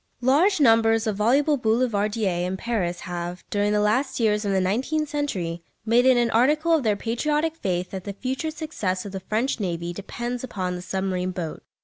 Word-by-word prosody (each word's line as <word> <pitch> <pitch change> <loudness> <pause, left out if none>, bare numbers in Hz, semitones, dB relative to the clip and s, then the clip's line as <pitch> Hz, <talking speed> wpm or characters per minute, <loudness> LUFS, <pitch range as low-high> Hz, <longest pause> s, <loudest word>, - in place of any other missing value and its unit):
Large 315 +10 +3
numbers 225 -3 +4
of 215 -3 -1
voluble 275 +8 +3
"Boulevardiers" 215 -5 +1
in 190 +1 -3
Paris 190 -6 -2
have, 175 -1 -5
during 205 0 +1
the 210 - +2
last 255 +7 +1
years 210 -2 +2
of 200 - -1
the 190 - +2
nineteenth 260 +12 0
century, 185 - -3 0.2
made 240 +3 +4
it 260 -1 +6
an 240 -1 +2
article 300 +8 +3
of 320 - +4
their 215 -4 +2
patriotic 300 +9 -1
faith 180 - -2
that 190 -2 -6
the 200 - -4
future 260 - -3
success 295 - -3
of 200 - -6
the 190 - -4
French 220 +7 -1
navy 175 -3 -3
depends 240 +6 -5
upon 185 -7 -3
the 180 - -6
submarine 185 0 -2
boat. 175 -4 -5
220 Hz, 190 wpm, -24 LUFS, 185-260 Hz, 0.2 s, it